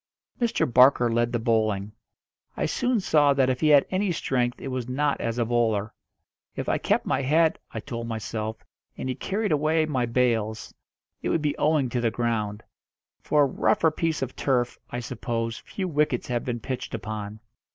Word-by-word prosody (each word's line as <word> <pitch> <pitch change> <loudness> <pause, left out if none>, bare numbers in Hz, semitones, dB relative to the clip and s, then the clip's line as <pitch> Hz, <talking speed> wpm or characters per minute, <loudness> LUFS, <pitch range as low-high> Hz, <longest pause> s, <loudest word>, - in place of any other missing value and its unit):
Mr. 235 -1 +2
Barker 125 -1 +5
led 120 +1 +1
the 120 - +1
bowling. 110 -3 0 0.7
I - - 0
soon 250 -2 +1
saw 150 -6 +3
that 130 -1 +3
if 125 - -3
he 155 - +3
had 145 -2 +6
any 190 0 +1
strength 125 -6 -1
it - - -5
was 125 -1 -4
not 145 +2 0
as 115 0 -2
a 120 - +1
bowler. 110 -3 0 0.6
If - - -4
I - - +1
kept - - +1
my - - 0
head, 160 +4 +3
I - - -5
told 115 -4 -5
myself, 110 -1 -4 0.3
and - - -4
he - - 0
carried 200 - -2
away 155 +2 +2
my 130 -6 -1
bails, 115 -3 0 0.5
it - - -2
would 160 - 0
be 145 -1 0
owing 150 -3 +2
to 120 0 -1
the 115 - +2
ground; 110 -3 -2 0.6
for 150 -1 +3
a - - +5
rougher 160 +4 +2
piece 160 -2 -1
of 130 - -5
turf, 125 -3 0
I 120 - -4
suppose, 115 -1 -3
few 190 -2 -5
wickets 150 -7 0
have 120 -1 -1
been 120 -2 -3
pitched 130 0 -4
upon. 110 -1 -6
125 Hz, 185 wpm, -26 LUFS, 115-150 Hz, 0.7 s, had